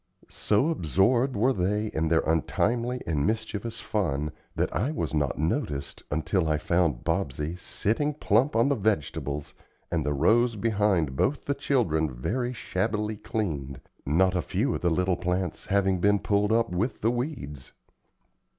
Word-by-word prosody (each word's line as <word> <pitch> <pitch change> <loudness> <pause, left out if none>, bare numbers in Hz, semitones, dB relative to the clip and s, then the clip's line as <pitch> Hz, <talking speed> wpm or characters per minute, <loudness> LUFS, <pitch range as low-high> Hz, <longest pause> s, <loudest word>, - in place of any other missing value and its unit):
So 105 +9 +1
absorbed 120 - +2
were 125 +6 +3
they 105 +2 0
in 80 +1 0
their 80 0 +3
untimely 120 +10 0
and 75 -4 0
mischievous 110 +1 -2
fun 75 -8 -1 0.2
that - - -1
I 125 - +1
was 85 - -3
not 75 -3 0
noticed 70 -2 -2
until 80 +3 0
I 75 -1 +2
found 85 -5 +1
Bobsey 80 -2 -1
sitting 115 - -1
plump 130 0 +2
on 115 +3 +4
the - - +3
vegetables, 75 - -2 0.4
and 85 -3 0
the 75 +1 0
rows 115 - +3
behind 100 - +1
both 135 - 0
the 140 - +1
children 90 - +1
very 120 - -2
shabbily 105 -1 -2
cleaned, 80 - -3 0.2
not 90 +6 +2
a 90 - +2
few 115 +10 -1
of - - -3
the 90 - +2
little 90 +2 +1
plants 90 -1 -2
having 95 -1 +2
been 100 +3 +4
pulled 100 +1 +1
up 115 -1 +2
with 105 +7 -1
the 115 - +3
weeds. 120 - -5
95 Hz, 155 wpm, -27 LUFS, 80-115 Hz, 0.4 s, on